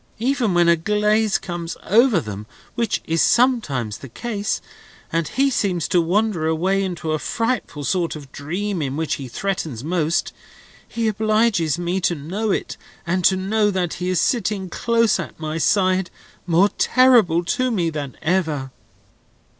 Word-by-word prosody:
Even 240 -5 0
when 175 0 +4
a 170 - +6
glaze 210 +4 +1
comes 175 -2 -6
over 225 0 +4
them 105 -5 -7 0.3
(which 235 -1 -1
is 165 0 +1
sometimes 150 - +2
the 135 - -10
case), 210 - -3 0.5
and 165 -2 0
he 275 - +1
seems 185 -8 0
to 175 - +3
wander 180 -1 0
away 185 +5 +1
into 175 -4 -3
a 155 - 0
frightful 230 -11 -2
sort 170 +2 0
of 140 -3 -10
dream 180 +5 -3
in 140 -1 -3
which 160 -1 -1
he 135 - -6
threatens 155 - -3
most, 165 0 0 0.5
he 230 -1 -2
obliges 215 -6 +1
me 175 +2 -2
to 175 - +1
know 185 +9 -3
it, - - -2 0.3
and 180 +2 0
to 190 - +5
know 205 +3 +1
that 185 -4 -1
he 180 - -1
is 185 -3 +1
sitting 205 -6 0
close 230 0 +2
at - - -7
my 155 0 -3
side, 185 0 +2 0.4
more 180 +4 +4
terrible 230 -10 +4
to 255 +7 0
me 175 -8 0
than 145 -4 -6
ever." 160 -6 0
185 Hz, 160 wpm, -21 LUFS, 160-215 Hz, 0.5 s, a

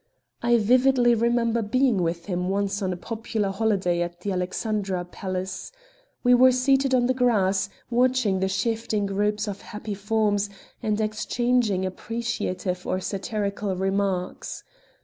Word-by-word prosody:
I 240 0 +4
vividly 245 +2 +4
remember 235 0 +2
being 230 -1 +2
with 170 0 -2
him 180 -2 -2
once 200 +1 -1
on 190 -1 0
a 180 - -3
popular 220 0 -3
holiday 195 -4 +1
at 175 0 -4
the 200 - -2
Alexandra 185 0 -2
Palace. 185 +1 -5 0.5
We 245 -1 +5
were 255 +1 +7
seated 265 +1 +3
on 245 -1 +3
the 255 - +2
grass, 200 -6 +2 0.2
watching 245 -5 +2
the 190 - +1
shifting 215 +1 -1
groups 210 +2 0
of 200 -1 -5
happy 210 0 -6
forms, 205 0 0 0.3
and 215 0 0
exchanging 215 -1 +1
appreciative 185 -3 -3
or 185 - 0
satirical 200 0 -2
remarks. 190 -1 -2
210 Hz, 135 wpm, -25 LUFS, 190-235 Hz, 0.5 s, were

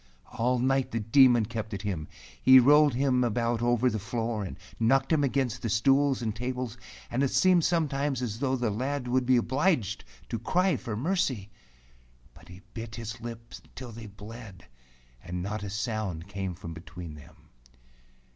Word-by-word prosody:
All 125 +2 +2
night 135 +1 +1
the 115 - -2
Demon 120 +1 +5
kept 110 0 -5
at 100 - -7
him. 90 -7 -3 0.3
He 130 0 +8
rolled 145 +1 +5
him 130 -1 +2
about 115 0 0
over 120 +1 +2
the 110 -3 0
floor, 115 0 -2
and 95 - -7 0.2
knocked 135 +6 +3
him 150 -2 +3
against 130 -4 0
the 115 - -2
stools 135 +4 +3
and 110 -2 -2
tables, 125 0 -4 0.4
and 125 - 0
it 140 - +2
seemed 180 +1 +4
sometimes 145 -5 0
as 110 -2 -4
though 135 -1 +1
the 120 -4 -1
lad 130 +4 -2
would 125 0 +1
be 130 -1 +5
obliged 130 - +1 0.3
to 115 - -3
cry 180 - +2
for 115 -5 -5
mercy. 130 - -1 0.8
But - - -17
he 95 +2 -13
bit 115 -1 -6
his 115 0 -7
lips 115 0 -8
till 125 -2 -8
they 115 -1 -9
bled, 105 0 -11 0.6
and 90 0 -4
not 100 +2 -3
a 100 - -5
sound 100 -4 -3
came 95 -3 -4
from 85 -1 -8
between 85 -1 -9
them. 75 -1 -14
120 Hz, 175 wpm, -28 LUFS, 105-130 Hz, 0.8 s, He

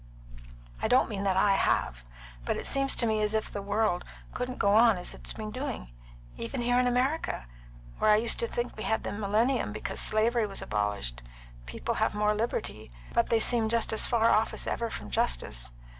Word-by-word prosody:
I - - +1
don't 250 +3 +3
mean 200 -3 -4
that 190 -1 +1
I 200 +1 +4
have. - - 0 0.4
But - - -1
it - - -5
seems 275 0 +2
to 235 - +2
me 220 -1 +1
as 210 +1 +1
if 220 - -1
the 205 - -4
world 205 -2 0 0.3
couldn't 250 0 -4
go 200 0 +3
on 225 -1 +6
as 180 - -3
it - - -13
has - - -3
been 215 -1 -6
doing. 255 - -5 0.5
Even 115 - -4
here 245 +1 +3
in 250 - +2
America, 250 - 0 0.5
where - - +3
I 210 - +7
used 225 +2 +2
to 235 - +1
think 240 +1 -3
we 215 - -8
had 220 - -1
the - - -3
millennium 220 +5 0
because - - -4
slavery 225 +1 +2
was 195 - -6
abolished, 100 -13 -2 0.5
people - - -3
have - - +1
more 210 0 +2
liberty, 210 - -3 0.2
but 235 - +2
they 230 - +3
seem 225 -1 +3
just 230 0 +1
as 220 - +3
far 230 -2 +3
off 220 +1 +2
as - - -3
ever 230 -1 -2
from - - -7
justice. 65 - 0
220 Hz, 205 wpm, -29 LUFS, 200-235 Hz, 0.5 s, I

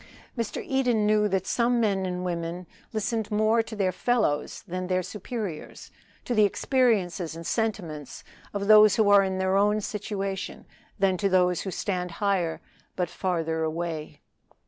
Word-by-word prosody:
Mr. 230 -3 -3
Eden 250 -5 +1
knew 210 0 +3
that 190 -2 -1
some 240 +3 +1
men 195 -4 +1
and 180 0 -3
women 170 0 -3 0.3
listen 220 +1 -1
more 215 +2 +3
to 225 0 -8
their 195 -3 +1
fellows 185 -7 0
than 185 +1 -4
their 185 0 0
superiors 200 -2 -6 0.3
to 245 - -1
the 215 -2 +5
experiences 200 - +1
and 165 0 -8
sentiments 175 - -3 0.3
of 200 -1 -3
those 215 -1 +7
who 210 -2 +3
are 200 -1 +8
in 190 -1 -1
their 190 0 +1
own 210 +2 +3
situation, 200 -2 -4 0.3
than 190 -2 +2
to 195 +3 +1
those 180 -2 +3
who 195 - -4
stand 180 -2 -3
higher 190 -5 0 0.3
but 180 -3 -1
farther 165 -4 -2
away. 160 -2 -4
195 Hz, 155 wpm, -26 LUFS, 180-215 Hz, 0.3 s, are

